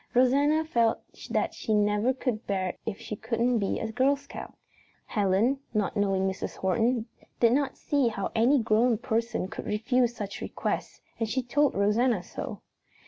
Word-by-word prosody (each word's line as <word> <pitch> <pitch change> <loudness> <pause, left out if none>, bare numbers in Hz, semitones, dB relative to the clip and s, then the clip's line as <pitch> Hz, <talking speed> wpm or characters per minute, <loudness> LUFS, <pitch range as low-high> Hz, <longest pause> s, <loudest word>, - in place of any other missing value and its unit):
Rosanna 285 +5 +4
felt 235 -6 +2 0.3
that - - 0
she 215 - -1
never 210 +3 +2
could 250 -4 -3
bear 190 -2 0
it - - -8
if 210 -3 -3
she 210 - -5
couldn't 235 +2 0
be 200 - -1
a 220 - -3
Girl 265 +5 +3
Scout. 280 0 -10 0.5
Helen, 210 +6 +1 0.2
not 210 -2 0
knowing 195 -2 +1
Mrs. 190 0 -4
Horton, 225 +5 +1 0.3
did 235 -1 +5
not 280 +1 0
see 285 -4 +1
how 205 -4 -2
any 240 +6 +4
grown 225 +2 +3
person 225 -2 -1
could - - -7
refuse 235 +3 +1
such 205 -3 -6
a - - -2
request - - -4 0.2
and 225 -2 -1
she 260 +3 0
told 285 +4 +2
Rosanna 210 +1 +2
so. - - -7
230 Hz, 170 wpm, -28 LUFS, 210-255 Hz, 0.5 s, did